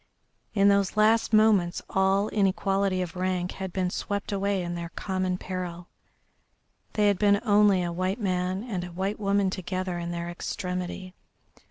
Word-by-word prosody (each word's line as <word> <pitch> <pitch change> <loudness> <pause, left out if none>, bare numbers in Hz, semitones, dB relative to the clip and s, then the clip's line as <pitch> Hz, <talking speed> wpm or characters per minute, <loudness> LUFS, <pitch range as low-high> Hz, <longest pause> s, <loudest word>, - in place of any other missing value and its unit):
In 200 -1 +5
those 200 0 +2
last 220 +1 +4
moments 215 -5 +4
all 190 +2 +2
inequality 195 -1 +1
of 175 -1 -8
rank 180 0 -1
had 190 -1 -6
been 180 0 -1
swept 205 +2 -3
away 200 -1 0
in 175 0 -4
their 170 -1 -5
common 185 -2 -1
peril 180 -2 -6 1.0
they 210 - +2
had 200 -2 +2
been 200 -1 +4
only 205 -3 +4
a 175 - -2
white 185 +5 -1
man 185 -1 -1
and 200 -8 -4
a - - -5
white 190 +4 -3
woman 200 -1 +1
together 185 -1 -3
in 170 0 -4
their 170 0 -4
extremity. 180 +1 -4
190 Hz, 160 wpm, -27 LUFS, 180-200 Hz, 1.0 s, In